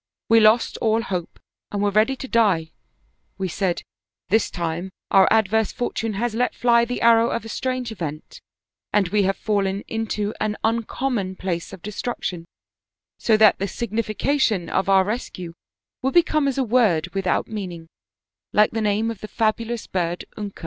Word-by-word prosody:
" - - -69
We 225 - +8
lost 220 +2 +4
all 225 0 +1
hope 180 -6 -4 0.3
and 205 - -2
were 205 - +2
ready 215 +6 +3
to 265 - -7
die; 195 -10 +2 0.7
we 190 - -2
said: 180 0 -1 0.2
' - - -58
This 220 +1 +3
time 170 +1 -3 0.2
our 195 -2 +5
adverse 220 0 +2
fortune 225 -2 -2
has 225 +3 -1
let 245 +2 0
fly 235 -1 +4
the 245 +1 -4
arrow 230 0 +5
of 230 - -3
a - - -7
strange 255 0 -2
event, 160 -7 -7 0.5
and 200 -4 +2
we 210 +2 +2
have 195 - -1
fallen 200 -2 0
into 220 -2 -2
an 215 0 -1
uncommon 225 -3 -1
place 180 -1 -3
of 190 -3 -11
de 210 - -5
struction, 190 -6 -4 0.7
so 220 -2 +3
that 215 -1 +5
the 195 - -1
signification 220 0 -1
of 190 +1 0
our 190 -1 +6
rescue 185 -5 -5 0.5
will 265 - +1
be 345 +2 +6
come 305 -3 +1
as 275 - -1
a 270 - +2
word 210 -9 +2
without 195 -2 0
meaning, 185 -6 -6 0.7
like 210 0 +4
the 225 - -2
name 215 +2 +1
of 225 - -8
the 215 - -6
fabulous 230 +1 -1
bird 175 -1 -2
Unka.' 205 -2 -7
215 Hz, 175 wpm, -23 LUFS, 190-230 Hz, 0.7 s, We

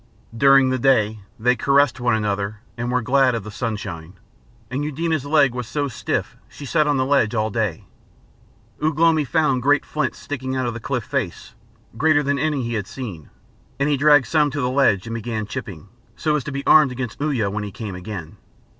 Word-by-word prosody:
During 135 +2 +5
the 130 - 0
day 110 -5 +2 0.2
they 125 +3 +2
caressed 140 -1 +2
one 120 -1 +2
another 105 0 -2
and 120 +1 -3
were 125 -1 0
glad 130 0 +3
of 115 - -4
the 105 - -8
sunshine, 100 -7 -5 0.6
and 135 +3 -2
Eudena's 155 -1 -2
leg 145 -4 +4
was 125 -2 -5
so 145 -1 -2
stiff 125 - -3
she 145 - -10
sat 155 +2 +1
on 145 -1 +2
the 130 - +1
ledge 135 -5 +2
all 110 0 0
day. 105 -7 -2 1.0
Ugh 155 -1 0
lomi 165 -1 +4
found 140 -2 +1
great 145 +3 +3
flints 150 -4 -2
sticking 130 -2 -5
out 130 -1 -1
of 120 - -2
the 120 - -6
cliff 125 0 -3
face, 125 -9 -4 0.4
greater 150 +2 +3
than 140 0 0
any 145 -2 0
he 120 0 -3
had 105 -3 -3
seen, 100 - -8 0.5
and 140 +2 +1
he 145 - +3
dragged 145 -1 +5
some 150 -2 +2
to 145 +1 -3
the 125 -1 0
ledge 130 -8 +2
and 115 - -5
began 115 -1 -3
chipping, 100 - -7 0.3
so 155 -1 0
as 150 - -1
to 150 - -4
be 140 +1 -5
armed 155 -4 +6
against 125 0 -5
Uya 130 -10 0
when 105 +1 -3
he 100 - -6
came 105 -1 -6
again. 90 -3 -7
130 Hz, 205 wpm, -21 LUFS, 110-145 Hz, 1.0 s, armed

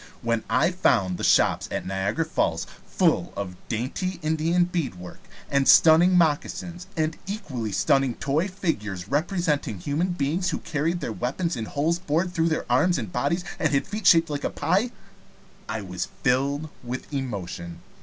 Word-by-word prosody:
When 115 -1 0
I 130 +10 +3
found 115 - +1
the - - -4
shops - - +3
at - - -3
Niagara 95 - -1
Falls 85 - 0 0.2
full - - +1
of 90 -3 -4
dainty 140 - -2
Indian 160 +3 +2
beadwork, 135 - -4 0.3
and 140 -1 +1
stunning 170 +3 +7
moccasins, 175 +2 0
and 155 0 0
equally 140 - -4
stunning 135 +4 +2
toy 150 +7 0
figures 110 - -3
representing 150 - 0
human 145 - -1
beings 170 +4 0
who 165 - -1
carried 165 +3 -2
their 110 - -3
weapons 160 +10 -2
in 115 - -3
holes 155 +8 0
bored 175 +1 -1
through 165 -2 +2
their 160 - -1
arms 155 +9 +3
and 110 -8 -5
bodies, 170 +6 0 0.2
and 155 -3 +1
had 135 - +1
feet 210 -1 -2
shaped 165 -2 +6
like 145 -1 -3
a - - 0
pie, 205 +7 +1 0.8
I 110 0 -2
was 90 -2 -4 0.2
filled 140 +4 +1
with 125 +4 -6
emotion. 95 -10 -5
145 Hz, 160 wpm, -25 LUFS, 115-170 Hz, 0.8 s, stunning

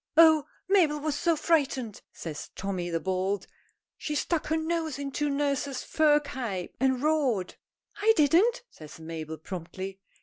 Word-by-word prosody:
"Oh, 315 -3 +7 0.2
Mabel 340 -7 +3
was 305 0 -1
so 335 +3 +1
frightened!" 275 -9 0
says 155 -3 -7
Tommy, 185 -3 -3
the 165 -1 0
Bold. 190 +2 -1 0.5
"She 300 - -3
stuck 330 +2 0
her 320 - +1
nose 320 -3 -1
into 285 +1 -2
nurse's 280 -1 -1
fur 300 -1 +4
cape 240 -11 -5
and 260 0 +1
roared!" 270 - +1 0.4
"I 440 +2 +4
didn't!" 370 - +4
says 155 0 -12
Mabel 160 -1 -6
promptly. 185 +3 -7
280 Hz, 140 wpm, -28 LUFS, 190-315 Hz, 0.5 s, Oh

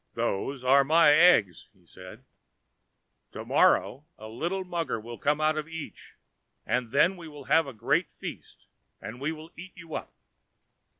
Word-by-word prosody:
"Those 130 +7 -3
are 135 +2 +5
my 160 +2 +5
eggs," 110 - +4 0.2
said 95 +8 -14 1.1
he; - - -11
"to - - -7
morrow 145 +4 +2
a 110 - -10
little 170 +12 -3
mugger 170 -9 -3
will 115 +2 -10
come 145 +1 0
out 155 0 +1
of 155 - -6
each, 165 -2 -10 0.5
and 125 -2 -1
then 150 +9 +3
we 170 -2 -10
will 150 -2 -11
have 160 +3 +2
a - - -6
great 140 - 0
feast, - - -10 0.3
and 120 +4 -9
we 145 +3 -1
will 160 +1 -10
eat 185 +3 -11
you 165 -1 -12
up." - - -6
150 Hz, 165 wpm, -27 LUFS, 120-165 Hz, 1.1 s, are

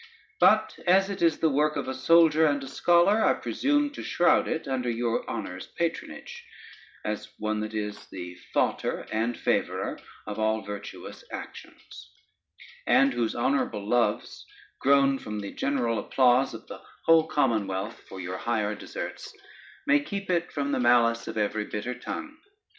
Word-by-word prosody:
But 215 0 +4
as 195 +2 +4
it 195 - -6
is 165 -2 +3
the 160 - +2
work 150 +2 +2
of - - -3
a 130 - -2
soldier 160 +3 +5
and 145 -1 0
a - - -7
scholar, 175 +9 +3
I - - +4
presumed 290 +1 0
to - - -7
shroud 175 - +3
it 160 - -3
under 130 -2 -1
your 115 0 -1
Honor's 90 0 -5
patronage, 475 - -4 0.6
as 105 0 -4
one 110 0 -2
that 110 +1 -4
is 105 -1 -4
the 90 -1 -8 0.2
fautor - - 0
and 115 +2 -1
favorer - - -1 0.3
of 105 0 -5
all 110 0 +1
virtuous 100 -1 -8
actions; - - -10 0.8
and 135 -1 +4
whose 120 -2 -1
honorable 115 -5 0
loves, 120 +1 0 0.4
grown 140 0 +4
from 105 -1 -5
the 100 -1 -6
general 120 -5 0
applause 130 +3 +3
of - - -10
the - - -10 0.2
whole 165 -1 +5
commonwealth 110 -8 0
for 95 - -8
your 90 0 -4
higher 110 -3 -1
deserts, - - -7 0.5
may 290 0 +5
keep 200 -9 -4
it 175 -1 0
from 140 -1 -2
the - - 0
malice 120 -1 +3
of - - -5
every 105 0 0
bitter 105 +5 -4
tongue. 310 - -7
125 Hz, 160 wpm, -27 LUFS, 110-165 Hz, 0.8 s, soldier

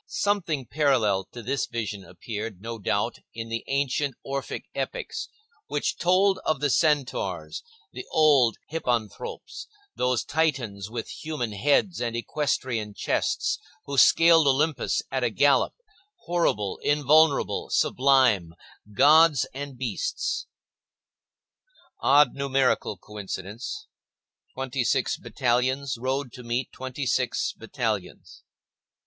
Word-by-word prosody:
Something 170 -10 -1
parallel 115 -9 +2
to 120 +4 -10
this 135 +4 -1
vision 105 -4 -4
appeared, 105 +3 -7
no 115 +2 -6
doubt, 100 +3 -1 0.2
in 115 0 -6
the 115 0 -3
ancient 140 0 0
Orphic 135 0 -4
epics, - - -4 0.4
which - - -2
told 185 +2 +3
of 155 -3 0
the 145 -2 +1
centaurs, 150 -4 0 0.3
the - - -8
old 140 -8 +4
hippanthropes, 120 -9 -3 0.3
those 125 -2 +1
Titans 130 - -1
with 115 0 -5
human 150 -8 -4
heads 145 - +1
and 120 -1 -2
equestrian 120 -5 -2
chests - - 0 0.3
who 140 - -4
scaled 165 +3 +6
Olympus 140 0 +1
at 130 -1 -1
a 120 - +2
gallop, 140 +6 +3 0.5
horrible, 165 - 0
invulnerable, 150 +1 +3
sublime—gods 130 - +3
and 140 -1 -7
beasts. - - -2 1.5
Odd 145 -1 +5
numerical 135 -6 0
coincidence,—twenty 120 - -7
six - - +1
battalions 130 +2 0
rode 130 0 -2
to 125 - -9
meet 120 +1 -2
twenty 130 +2 -5
six 125 -1 0
battalions. 115 -6 -4
130 Hz, 105 wpm, -26 LUFS, 115-145 Hz, 1.5 s, scaled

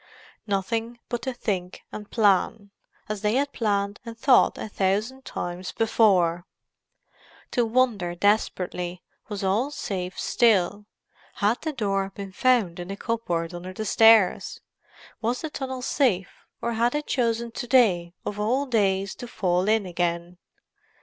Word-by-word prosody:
Nothing 225 +4 -2
but 240 -2 -2
to 260 - -2
think 185 -6 -3
and 210 -1 -8
plan, 205 -1 +2 0.4
as 215 -2 -4
they 210 +2 +1
had 280 +2 +1
planned 200 -2 -1
and 230 -1 -8
thought 255 +2 +4
a - - -5
thousand 210 +7 -1
times 175 +1 -5
before; 185 -6 +2 1.0
to 240 -3 +1
wonder 220 -8 +1
desperately 180 -2 0 0.3
was 205 -2 -4
all 210 +8 +1
safe 185 -10 -4
still—had 210 +1 0
the 315 - -2
door 195 -7 -1
been 200 -1 -7
found 215 -6 +2
in 175 - -6
the 195 +1 -6
cupboard 180 -8 -2
under 180 +2 -7
the 215 +3 -5
stairs? 220 -2 +4 0.6
was 235 +2 -1
the 315 - -5
tunnel 260 -3 -5
safe, 225 -11 0 0.2
or 235 0 0
had 235 +4 +1
it 300 0 -2
chosen 235 -2 0
to 245 +2 -6
day 185 -9 +3
of 205 - -4
all 250 +7 +1
days 200 -6 +1
to 245 - -9
fall 180 -4 0
in 220 -2 +2
again? 175 0 -2
210 Hz, 145 wpm, -25 LUFS, 185-235 Hz, 1.0 s, thought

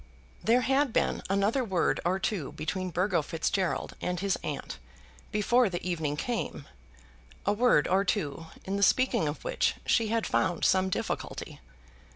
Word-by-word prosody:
There 240 +3 +4
had 270 +1 +2
been - - +1
another 200 +7 +2
word 190 -6 +1
or 180 +2 +1
two 190 -6 -2
between 185 +4 -3
Burgo 180 0 +1
Fitzgerald 165 +4 -1
and 180 -1 -2
his 195 0 +1
aunt 145 -2 -5 0.5
before 230 +2 +3
the 180 0 -4
evening 155 -4 -1
came, 230 - -3 0.8
a 205 - +3
word 225 -8 +4
or 190 +2 +3
two 165 -6 -2 0.2
in 195 +1 -2
the - - -2
speaking 235 -4 +3
of 145 - -4
which - - +1
she 225 -2 +3
had 225 +1 0
found 175 -3 +1
some 190 0 +3
difficulty. - - -4
190 Hz, 155 wpm, -29 LUFS, 175-220 Hz, 0.8 s, There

